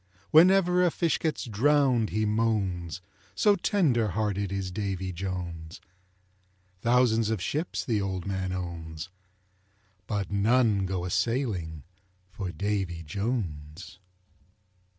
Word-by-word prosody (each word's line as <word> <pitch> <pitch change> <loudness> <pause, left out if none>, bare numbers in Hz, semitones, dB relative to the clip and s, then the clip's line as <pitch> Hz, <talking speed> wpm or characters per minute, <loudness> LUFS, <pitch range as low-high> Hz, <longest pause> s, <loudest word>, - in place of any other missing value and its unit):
Whenever 180 +2 +6
a 180 - +4
fish 165 0 0
gets 155 -2 -2
drowned, 125 0 +2
he 110 +1 0
moans, 100 -6 -1 0.3
So 205 -1 +4
tender 160 - +2
hearted 100 -1 -1
is 95 -2 -3
Davy 95 -2 -3
Jones. 85 -3 -5 1.0
Thousands 115 -2 +3
of 110 -2 0
ships 150 - -2
the 110 -4 0
old 95 -2 -3
man 95 -1 -2
owns, 85 -2 -5 1.0
But 100 -3 -2
none 105 -1 +3
go 90 -2 -2
a 90 - -4
sailing 95 - -1 0.5
for 95 -1 -5
Davy 95 -4 -2
Jones. 90 - -4
100 Hz, 110 wpm, -28 LUFS, 90-120 Hz, 1.0 s, Whenever